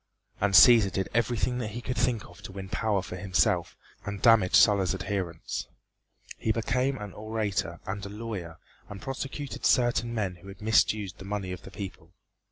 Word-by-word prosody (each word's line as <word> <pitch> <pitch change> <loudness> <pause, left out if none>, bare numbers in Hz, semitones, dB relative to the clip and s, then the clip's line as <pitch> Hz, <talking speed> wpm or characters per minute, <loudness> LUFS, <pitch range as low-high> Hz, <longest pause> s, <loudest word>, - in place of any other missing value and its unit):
And 100 -1 +2
Cæsar 115 -4 +8
did 95 +1 -2
everything 120 +2 0
that 115 - -2
he 120 - -5
could 125 - -3
think 120 -4 0
of 90 +3 -16
to 100 - -9
win 95 0 -8
power 105 -2 0
for 90 - -7
himself 90 -2 +1 0.3
and 100 -1 -5
damage 115 -5 +5
Sulla's 100 -3 +5
adherents. 95 -3 -4 0.7
He 110 - 0
became 125 +4 0
an 105 -4 -7
orator 105 -5 -3
and 100 +1 -4
a 100 - -5
lawyer 100 -6 -6 0.3
and 100 - -8
prosecuted 135 +3 -5
certain 120 -1 +2
men 100 -6 -2
who 85 +3 -15
had 100 +2 -10
misused 110 -2 +1
the 95 - -9
money 100 -2 -3
of 90 - -6
the - - -11
people. 95 -3 -8
100 Hz, 175 wpm, -28 LUFS, 95-115 Hz, 0.7 s, Cæsar